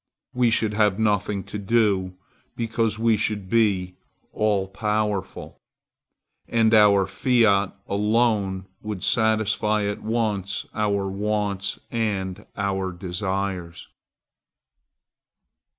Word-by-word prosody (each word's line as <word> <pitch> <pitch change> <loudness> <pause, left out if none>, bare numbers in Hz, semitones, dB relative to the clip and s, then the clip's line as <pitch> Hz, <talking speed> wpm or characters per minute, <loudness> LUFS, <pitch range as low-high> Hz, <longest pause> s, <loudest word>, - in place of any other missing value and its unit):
We 125 -1 +3
should 110 -1 +2
have 105 -2 +2
nothing 105 -2 0
to 105 - -6
do, 100 -3 +1 0.4
because 115 -2 -1
we 115 0 +3
should 105 -2 -1
be 95 -6 +1 0.4
all 105 -3 +1
powerful, 105 0 -3 0.9
and 115 -1 +2
our 100 -3 +6
fiat 110 -6 +2
alone 105 -2 +1 0.2
would 105 -3 -5
satisfy 110 -1 +2
at 100 0 -3
once 105 -4 -2
our 100 -2 0
wants 100 0 -2
and 100 -5 -2
our 95 -2 -1
desires. 95 -1 -4
105 Hz, 95 wpm, -24 LUFS, 95-110 Hz, 0.9 s, our